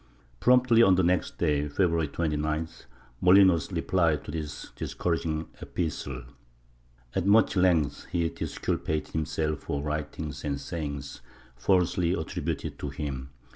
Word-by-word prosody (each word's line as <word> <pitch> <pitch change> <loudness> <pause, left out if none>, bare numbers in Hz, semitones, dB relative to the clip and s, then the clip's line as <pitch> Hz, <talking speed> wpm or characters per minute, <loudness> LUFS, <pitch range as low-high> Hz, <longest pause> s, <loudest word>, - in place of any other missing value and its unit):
Promptly 125 -2 +5
on 95 -5 +6
the 95 - +2
next 90 +1 +1
day, 75 -1 +1
February 85 +1 +1
29th, 75 +1 -2 0.4
Molinos 90 -2 +5
replied 80 -5 +1
to - - -7
this 75 -2 -6
discouraging 80 -2 -2
epistle. 70 -7 -4 0.9
At 95 0 0
much 105 +1 +5
length 90 -6 +2
he 85 -2 +1
disculpated 75 -1 -3
himself 75 0 -1
for 70 0 -3
writings 75 -1 -4
and 70 -2 -2
sayings 70 -5 -5 0.3
falsely 90 +4 +2
attributed 80 -4 -3
to 70 - -3
him. 70 -2 -5
80 Hz, 120 wpm, -28 LUFS, 75-90 Hz, 0.9 s, on